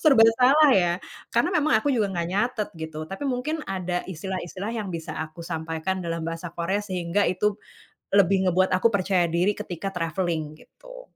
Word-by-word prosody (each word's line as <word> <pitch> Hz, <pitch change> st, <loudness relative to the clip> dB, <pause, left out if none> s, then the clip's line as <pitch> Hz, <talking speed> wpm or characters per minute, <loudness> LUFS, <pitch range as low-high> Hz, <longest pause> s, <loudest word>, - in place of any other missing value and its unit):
serba 270 Hz, -8 st, +6 dB, 0.2 s
salah 285 Hz, +4 st, +6 dB
ya 175 Hz, -6 st, +4 dB, 0.4 s
karena 240 Hz, +10 st, +1 dB
memang 305 Hz, -8 st, +3 dB
aku 280 Hz, +6 st, +1 dB
juga 220 Hz, -5 st, +1 dB
nggak 170 Hz, -3 st, -2 dB
nyatet 215 Hz, +1 st, 0 dB
gitu 160 Hz, -1 st, -6 dB
tapi 195 Hz, -, -4 dB
mungkin 270 Hz, +5 st, -2 dB
ada 180 Hz, -2 st, -2 dB
istilah-istilah 190 Hz, +3 st, -5 dB
yang 220 Hz, -4 st, -3 dB
bisa 165 Hz, -3 st, -5 dB
aku 160 Hz, +2 st, -6 dB
sampaikan 165 Hz, +3 st, -3 dB
dalam 165 Hz, -2 st, -3 dB
bahasa 165 Hz, +1 st, -4 dB
Korea 190 Hz, +4 st, 0 dB
sehingga 185 Hz, -1 st, 0 dB
itu, 210 Hz, +3 st, +1 dB, 0.6 s
lebih 195 Hz, -1 st, +4 dB
ngebuat 185 Hz, +1 st, +2 dB
aku 225 Hz, +5 st, +3 dB
percaya 190 Hz, -2 st, +2 dB
diri 180 Hz, +5 st, +1 dB
ketika 180 Hz, +2 st, -5 dB
travelling 165 Hz, -2 st, -2 dB
gitu. -, -, -14 dB
190 Hz, 165 wpm, -25 LUFS, 170-220 Hz, 0.6 s, serba